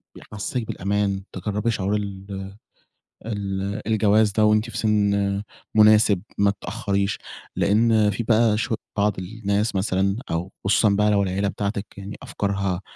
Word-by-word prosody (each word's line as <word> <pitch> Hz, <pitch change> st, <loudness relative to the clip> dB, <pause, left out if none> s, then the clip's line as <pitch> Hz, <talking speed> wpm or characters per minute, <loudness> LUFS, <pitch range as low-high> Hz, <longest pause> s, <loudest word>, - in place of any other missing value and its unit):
بيحسّسِك 105 Hz, +3 st, -5 dB
بالأمان، 100 Hz, 0 st, -1 dB
تجرّبي 105 Hz, +2 st, -1 dB
شعور 105 Hz, -1 st, -1 dB
ال 100 Hz, -2 st, -4 dB, 1.0 s
ال 100 Hz, -1 st, -3 dB
الجواز 110 Hz, -1 st, +3 dB
ده 110 Hz, +1 st, +3 dB
وأنتِ 110 Hz, +2 st, +3 dB
في -, -, -6 dB
سِن 100 Hz, -2 st, +1 dB, 0.3 s
مناسِب، 105 Hz, -3 st, +6 dB, 0.2 s
ما 100 Hz, 0 st, +4 dB
تتأخّريش. 100 Hz, 0 st, -2 dB, 0.4 s
لأن 110 Hz, 0 st, +3 dB
في 110 Hz, +4 st, -3 dB
بقى 110 Hz, -1 st, +3 dB
شو 115 Hz, +1 st, -1 dB, 0.2 s
بعض 105 Hz, -2 st, +1 dB
الناس 100 Hz, +2 st, -2 dB
مثلًا 95 Hz, +1 st, +1 dB
أو 85 Hz, +4 st, -2 dB
خصوصًا 105 Hz, +2 st, +4 dB
بقى 105 Hz, +1 st, +3 dB
لو 100 Hz, -1 st, +3 dB
العيلة 95 Hz, +2 st, -1 dB
بتاعتِك 100 Hz, +1 st, -3 dB
يعني 100 Hz, +1 st, -7 dB
أفكارها 100 Hz, -2 st, -2 dB
100 Hz, 135 wpm, -23 LUFS, 100-105 Hz, 1.0 s, مناسِب